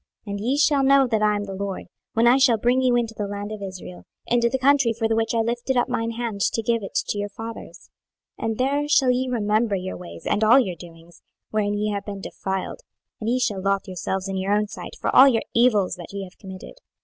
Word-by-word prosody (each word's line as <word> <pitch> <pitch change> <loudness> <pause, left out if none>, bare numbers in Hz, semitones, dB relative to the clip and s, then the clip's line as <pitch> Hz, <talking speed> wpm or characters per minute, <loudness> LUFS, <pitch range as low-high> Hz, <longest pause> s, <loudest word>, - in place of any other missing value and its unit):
26:020:042 205 - -6
And 200 - -3
ye 260 +5 +1
shall 285 -1 +3
know 275 0 +5
that 225 -3 0
I 210 0 +3
am 205 - -2
the 195 -1 -6
LORD, 195 0 -4 0.3
when 225 +1 +2
I 245 +2 +6
shall 260 -4 +4
bring 245 +4 +2
you 250 -1 +3
into 235 -2 0
the 205 -1 -3
land 205 +1 -5
of 215 -1 -6
Israel, 185 -2 -8 0.2
into 235 0 +2
the 265 - -1
country 270 -3 +3
for 225 -1 +1
the 225 - +1
which 225 +1 0
I 225 - +3
lifted 240 +3 -1
up 245 - +2
mine 230 0 -1
hand 225 -3 -4
to 225 - +1
give 230 0 +1
it 195 - -8
to 205 - -1
your 205 0 -3
fathers. 225 +2 -9 0.5
26:020:043 - - -2
And 220 - -3
there 280 +3 0
shall 275 -3 +4
ye 255 +1 0
remember 215 -2 +1
your 185 0 -4
ways, 180 -1 -11
and 210 - +1
all 230 +5 +7
your 190 -9 -1
doings, 165 0 -15 0.3
wherein 205 -1 0
ye 210 +1 -1
have 200 -1 -4
been 200 -1 -5
defiled; 190 - -4 0.4
and 220 - -3
ye 250 +2 +1
shall 210 -6 -1
lothe 195 0 0
yourselves 190 +1 -3
in 195 0 -3
your 190 +2 0
own 210 0 +1
sight - - -9
for - - -1
all 265 - +9
your 235 -4 +2
evils 225 -7 +3
that 175 - -10
ye 200 -1 -4
have 185 0 -13
committed. 190 - -10
220 Hz, 250 wpm, -23 LUFS, 200-245 Hz, 0.5 s, all